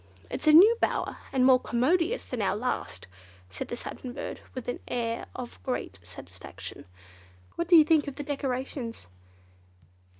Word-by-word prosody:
"It's - - -4
a - - +9
new 390 +9 +9
bower, - - 0
and 255 -1 +3
more 260 -1 +7
commodious 330 - +1
than 250 -3 -4
our 195 - +1
last," 215 - -3 0.5
said 95 - -5
the - - -4
Satin 245 +1 -7
Bird - - -6
with 255 - -6
an 245 - -3
air 230 -1 -2
of 250 -2 -8
great 175 - -4
satisfaction. 90 +1 -10 0.7
"What 340 - -2
do 350 - +6
you 320 - +10
think 310 -1 +3
of 280 - -5
the 290 - -5
decorations?" 260 - -4
255 Hz, 160 wpm, -28 LUFS, 235-300 Hz, 0.7 s, you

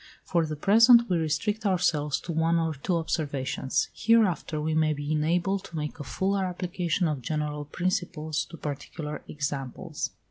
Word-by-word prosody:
For 170 -3 +1
the 155 - -3
present 230 - +6
we 175 - +3
restrict 160 +8 -1
ourselves 165 -7 +1
to 170 - -5
one 165 +1 +2
or 165 -1 0
two 155 +5 -2
observations; 140 -5 -1
hereafter 205 -9 +2
we 155 +1 -1
may 155 -1 +3
be 145 +1 -4
enabled 175 +5 +1
to 170 - -10
make 150 +1 -4
a - - -4
fuller 195 +6 0
application 180 -1 -1
of 150 -4 -2
general 150 +2 -2
principles 175 -2 -2
to 165 - -11
particular 150 +1 -5
examples. 140 -3 -4
160 Hz, 155 wpm, -27 LUFS, 150-180 Hz, -, present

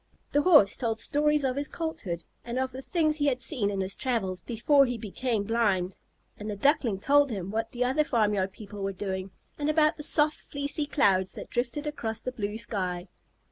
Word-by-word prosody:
The 290 - +3
Horse 300 - +6
told 225 -3 -1
stories 300 +1 +2
of 260 -1 0
his 285 0 0
Colthood, 195 - -4 0.2
and 240 +1 -4
of 260 0 -1
the 260 +1 -7
things 310 0 +1
he 290 -1 +1
had 255 -2 +1
seen 245 -6 +1
in 195 -1 -2
his 190 +1 -2
travels 195 -8 -1
before 270 +4 +3
he 245 -1 -2
became 225 +1 -2
blind. 200 -5 0 0.4
And 210 +1 -5
the 210 - -3
Duckling 235 -3 +2
told 285 +6 +4
him 195 -4 -4
what 225 +1 -2
the 245 0 -1
other 265 +5 +2
farmyard 210 -7 +1
people 205 0 -10
were 195 0 -2
doing, 190 0 -4 0.3
and 295 +1 0
about 305 +1 +3
the - - -6
soft, 300 0 +3
fleecy 285 +1 -2
clouds 190 -11 +2
that - - -9
drifted 245 +5 -2
across 225 -7 -3
the 255 - -4
blue 210 -4 -4
sky. 185 -5 -3
235 Hz, 200 wpm, -28 LUFS, 200-290 Hz, 0.4 s, Horse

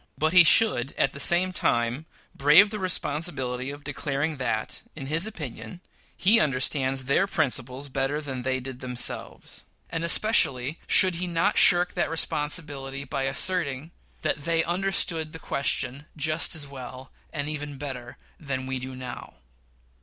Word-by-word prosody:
But 155 +2 0
he 180 -1 +9
should, 160 - +4
at - - +1
the 140 - -9
same 180 +5 +4
time, 120 +2 -1 0.3
brave 155 +9 +5
the 215 - -4
responsibility 140 -8 -2
of 145 +1 -9
declaring 145 +1 -3
that, 110 -4 -3
in 140 -4 -7
his 165 +8 +2
opinion, 145 - -8 0.4
he 215 +5 +4
understands 135 -1 0
their 140 +9 +1
principles 135 -5 -2
better 135 +2 -2
than 135 -4 -6
they 130 +1 -1
did 130 0 -8
themselves; 125 -2 -5 0.3
and 165 0 -3
especially 160 - +3
should 185 -3 +4
he 180 +1 -3
not 175 +4 0
shirk 180 0 +6
that - - -1
responsibility 150 -4 0
by 135 -1 -3
asserting 150 0 -1 0.3
that 145 - -2
they 165 -1 +2
"understood 175 -3 -1
the - - -6
question 140 -1 -1
just 155 +2 +1
as 155 -2 0
well, 130 -1 -10 0.2
and 145 -2 -4
even 150 -2 -5
better 130 -4 -7 0.2
than 135 -4 -4
we 130 0 -3
do 130 +1 -7
now." 125 - -9
145 Hz, 150 wpm, -25 LUFS, 130-165 Hz, 0.4 s, he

